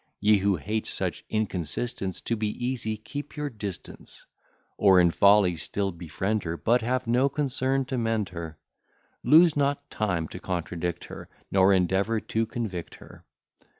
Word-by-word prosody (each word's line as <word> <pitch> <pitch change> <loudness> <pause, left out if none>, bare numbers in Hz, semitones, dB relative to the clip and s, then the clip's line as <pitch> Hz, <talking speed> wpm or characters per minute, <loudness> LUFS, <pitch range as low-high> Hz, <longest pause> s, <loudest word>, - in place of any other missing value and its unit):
Ye 105 +1 +4
who 100 0 +2
hate 105 +7 -3
such - - -3
inconsistence, 95 0 -2
To 115 - 0
be 110 -1 -1
easy, 115 -1 -2
keep 145 +7 -8
your 145 -1 -3
distance: 105 -5 -8 0.5
Or 95 -2 +5
in 85 -1 +5
folly 100 -1 +5
still 100 +4 -2
befriend 95 +5 -2
her, 80 0 -3
But 120 +6 +2
have 130 +3 -1
no 125 +4 +2
concern 135 -1 0
to 130 -1 -2
mend 115 -3 0
her; 85 -3 -7 0.7
Lose 165 +1 +6
not 145 0 0
time 90 -7 -1
to 90 - -8
contradict 90 -1 -3
her, - - -10 0.2
Nor 95 0 +5
endeavour 95 +4 +2
to 110 +1 -2
convict 110 -8 -5
her. - - -15
105 Hz, 150 wpm, -26 LUFS, 95-125 Hz, 0.7 s, Lose